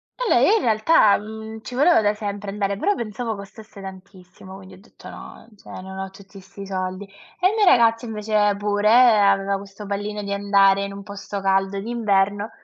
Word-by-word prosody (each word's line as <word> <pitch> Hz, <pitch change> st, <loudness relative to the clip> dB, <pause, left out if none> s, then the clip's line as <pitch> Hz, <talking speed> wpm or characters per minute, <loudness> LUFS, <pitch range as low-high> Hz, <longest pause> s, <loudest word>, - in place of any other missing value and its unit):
E -, -, -3 dB
lei 435 Hz, -, +4 dB
in -, -, -2 dB
realtà, 215 Hz, -1 st, +3 dB
mhmm, 220 Hz, +1 st, -9 dB
ci 250 Hz, -, -10 dB
voleva 300 Hz, +2 st, +4 dB
da 205 Hz, -1 st, +1 dB
sempre 205 Hz, -1 st, -6 dB
andare, 200 Hz, -1 st, -2 dB
però 405 Hz, -, +1 dB
pensavo 225 Hz, -, -4 dB
costasse 205 Hz, +1 st, -13 dB
tantissimo 190 Hz, -1 st, -12 dB
quindi 190 Hz, -1 st, -13 dB
ho -, -, -18 dB
detto: 205 Hz, -, -17 dB
"No, -, -, -12 dB
cioè, 205 Hz, -, -18 dB
non 190 Hz, 0 st, -10 dB
ho 190 Hz, 0 st, -5 dB
tutti 195 Hz, +1 st, -15 dB
'sti 195 Hz, +1 st, -11 dB
soldi". 185 Hz, 0 st, -4 dB, 0.3 s
E 360 Hz, -, +4 dB
il -, -, -3 dB
mio 430 Hz, -2 st, +3 dB
ragazzo 230 Hz, -7 st, +4 dB
invece, 210 Hz, -2 st, 0 dB
pure, 205 Hz, 0 st, -1 dB
aveva 200 Hz, -5 st, +4 dB
questo 200 Hz, +1 st, -11 dB
pallino 205 Hz, +1 st, -4 dB
di 200 Hz, 0 st, -4 dB
andare 200 Hz, -1 st, +3 dB
in 200 Hz, 0 st, -6 dB
un 200 Hz, 0 st, -9 dB
posto 200 Hz, 0 st, -7 dB
caldo 195 Hz, 0 st, 0 dB
d'inverno. 205 Hz, -2 st, 0 dB
205 Hz, 190 wpm, -22 LUFS, 195-220 Hz, 0.3 s, lei